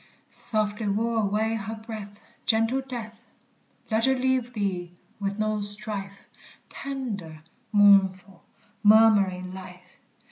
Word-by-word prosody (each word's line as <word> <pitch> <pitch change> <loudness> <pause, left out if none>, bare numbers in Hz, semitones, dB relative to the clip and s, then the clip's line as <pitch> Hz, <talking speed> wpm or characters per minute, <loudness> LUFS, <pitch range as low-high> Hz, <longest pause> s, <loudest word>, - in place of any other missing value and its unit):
Softly 215 -1 -1
woo 225 +3 0
away 220 +1 +1
her 220 0 -4
breath, 215 -2 -9 0.3
Gentle 225 +4 +2
death! 235 -4 -8 0.7
Let 220 +1 +3
her 265 0 +3
leave 255 -1 0
thee 180 -5 -3 0.2
with 200 0 -2
no 215 -1 0
strife, 205 -1 -5 0.5
Tender, 205 - -6 0.3
mournful, 195 -3 +4 0.4
murmuring 205 -4 +5
life! 180 -1 -12
210 Hz, 105 wpm, -26 LUFS, 195-225 Hz, 0.7 s, murmuring